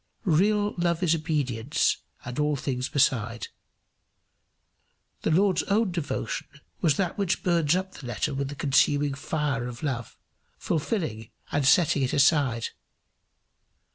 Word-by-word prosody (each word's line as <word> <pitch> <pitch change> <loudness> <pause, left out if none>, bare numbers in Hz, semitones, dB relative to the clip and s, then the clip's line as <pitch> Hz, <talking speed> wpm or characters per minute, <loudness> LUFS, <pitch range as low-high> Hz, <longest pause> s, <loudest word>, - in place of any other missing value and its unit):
Real 205 +4 +2
love 170 0 +1
is 170 -2 +4
obedience 145 -5 0 0.3
and 125 +2 -5
all 150 0 +2
things 130 -1 -3
beside. 120 -4 +1 1.7
The - - 0
Lord's 185 +3 +3
own 205 0 +2
devotion 170 -4 -3 0.3
was 155 -5 +3
that 190 +1 -1
which 195 -3 0
burns 170 -3 +2
up 190 +1 -2
the 130 - -9
letter 120 +5 -2
with 135 0 -2
the 145 - -6
consuming 145 +1 +2
fire 140 -3 -2
of 120 +2 -8
love, 125 -6 -3 0.4
fulfilling 150 - -2 0.2
and 145 -2 +1
setting 155 0 +4
it 130 - 0
aside. 140 -5 +3
145 Hz, 130 wpm, -26 LUFS, 130-170 Hz, 1.7 s, is